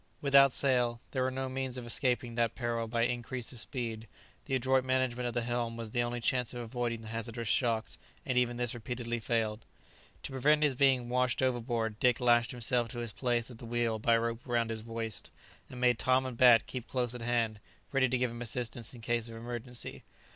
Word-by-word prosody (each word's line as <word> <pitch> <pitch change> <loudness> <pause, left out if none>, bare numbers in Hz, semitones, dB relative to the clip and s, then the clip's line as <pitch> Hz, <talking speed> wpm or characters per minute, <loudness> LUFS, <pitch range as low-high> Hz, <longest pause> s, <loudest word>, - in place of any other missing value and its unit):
Without 140 -1 +6
sail, 125 -3 +3
there 130 - -1
were 130 - +2
no 130 0 -3
means 130 -1 -3
of 125 - -6
escaping 120 -1 +1
that 115 -1 0
peril 115 -1 -2
by 115 +1 0
increase 120 0 -2
of 125 - -6
speed; 115 -3 -3 0.4
the 135 - -1
adroit 130 +1 +2
management 130 -1 0
of 120 - -4
the 120 - 0
helm 120 -1 -2
was 115 -2 -6
the 120 - +1
only 120 0 -2
chance 125 +1 0
of 120 - -4
avoiding 120 -1 -3
the 110 - -9
hazardous 115 +1 -4
shocks, 115 -1 0 0.3
and 130 -4 -1
even 120 -1 +2
this 120 -2 0
repeatedly 120 0 -4
failed. 110 -1 -1 0.6
To - - -5
prevent 150 +4 +3
his 145 -2 +3
being 130 -2 +3
washed 125 0 +1
overboard 120 -3 -1
Dick 125 -2 +3
lashed 120 -1 +4
himself 120 0 0
to 120 - -8
his 120 -2 -4
place 120 -1 0
at 115 - -12
the - - -9
wheel 115 -1 0
by 115 +2 +4
a - - +3
rope 115 0 -2
round 120 -2 0
his 110 -1 -5
waist, 115 -2 -5 0.4
and 125 - -8
made 125 -2 +3
Tom 130 0 +3
and 130 -2 -4
Bat 120 -2 +7
keep 125 -2 -6
close 125 -2 -1
at 125 - -7
hand, 115 -2 0 0.3
ready 135 -2 +3
to 130 - +1
give 125 -1 0
him 120 +1 -8
assistance, 120 0 -3
in 120 - -11
case 115 0 -1
of 115 - -8
emergency. 120 +1 -6
120 Hz, 215 wpm, -31 LUFS, 115-125 Hz, 0.6 s, Bat